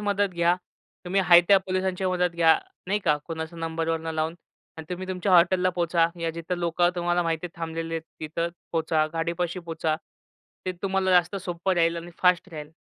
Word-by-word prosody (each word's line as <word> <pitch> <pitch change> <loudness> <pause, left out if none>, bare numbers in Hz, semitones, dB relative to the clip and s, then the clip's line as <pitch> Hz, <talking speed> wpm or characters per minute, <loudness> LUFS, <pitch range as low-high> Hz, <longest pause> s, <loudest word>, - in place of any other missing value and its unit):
मदत 205 -1 +1
घ्या. 170 +1 +3 0.5
तुम्ही 190 +2 +1
हाय 175 -1 +8
त्या 200 -1 +7
पोलिसांची 185 0 -1
मदत 180 -1 +1
घ्या, 165 -1 +5 0.3
नाही 205 +2 +1
का? 150 -3 +4
कोणाचा 160 0 -5
नंबरवरनं 165 0 -2
लावून 160 +1 -1 0.4
अन् 160 - -6
तुम्ही 185 +1 -4
तुमच्या 185 +1 -1
हॉटेलला 180 +1 +5
पोहचा. 170 -1 +3
या 165 -1 0
जिथं 170 +2 -4
लोकं 175 +1 +2
तुम्हाला 175 0 +1
माहिती 165 +1 -1
थांबलेले 165 0 -4
आहेत, 165 - -3 0.2
तिथं 165 +2 -2 0.2
पोचा, 160 -1 +1
गाडीपाशी 170 +2 -2
पोचा. 160 -1 -1 0.7
ते 185 - 0
तुम्हाला 190 -1 +1
जास्त 180 +2 +3
सोप्पं 180 0 -2
राहील 170 0 +2
आणि 170 +1 -7
फास्ट 180 +1 +3
राहील, 150 -2 -7
170 Hz, 175 wpm, -26 LUFS, 165-180 Hz, 0.7 s, हाय